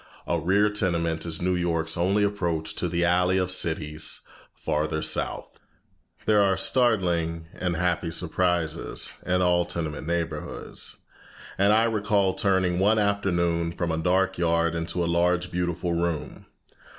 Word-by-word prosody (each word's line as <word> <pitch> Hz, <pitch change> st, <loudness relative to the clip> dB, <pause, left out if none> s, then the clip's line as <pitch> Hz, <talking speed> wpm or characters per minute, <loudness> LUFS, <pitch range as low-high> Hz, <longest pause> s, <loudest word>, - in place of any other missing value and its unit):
A -, -, 0 dB
rear 100 Hz, +4 st, +2 dB
tenement 85 Hz, -5 st, 0 dB
is 80 Hz, +1 st, -2 dB
New 90 Hz, 0 st, +1 dB
York's 85 Hz, -2 st, 0 dB
only 95 Hz, +4 st, +2 dB
approach 85 Hz, -6 st, -1 dB
to 90 Hz, -, -1 dB
the 85 Hz, +1 st, +1 dB
alley 90 Hz, +2 st, +3 dB
of 90 Hz, -1 st, 0 dB
cities 80 Hz, -3 st, -1 dB, 0.3 s
farther 80 Hz, +1 st, -2 dB
south. -, -, -2 dB, 0.7 s
There 105 Hz, -1 st, +4 dB
are 95 Hz, -1 st, +2 dB
startling 85 Hz, -10 st, +1 dB
and 90 Hz, -2 st, -2 dB
happy 90 Hz, 0 st, 0 dB
surprises 85 Hz, -1 st, -1 dB
in 90 Hz, 0 st, +2 dB
all 90 Hz, -1 st, +3 dB
tenement 80 Hz, -4 st, -4 dB
neighborhoods, 85 Hz, -1 st, -5 dB, 0.6 s
and 100 Hz, +2 st, +3 dB
I 110 Hz, +1 st, +4 dB
recall 105 Hz, -4 st, +1 dB
turning 95 Hz, -3 st, +1 dB
one 105 Hz, +3 st, +3 dB
afternoon 85 Hz, -5 st, 0 dB
from 85 Hz, -1 st, -2 dB
a 80 Hz, -, -1 dB
dark 95 Hz, +2 st, +1 dB
yard 85 Hz, -1 st, +2 dB
into 85 Hz, +1 st, -2 dB
a -, -, 0 dB
large 90 Hz, +1 st, +1 dB
beautiful 85 Hz, 0 st, -2 dB
room. 85 Hz, -2 st, -3 dB
90 Hz, 140 wpm, -25 LUFS, 85-95 Hz, 0.7 s, There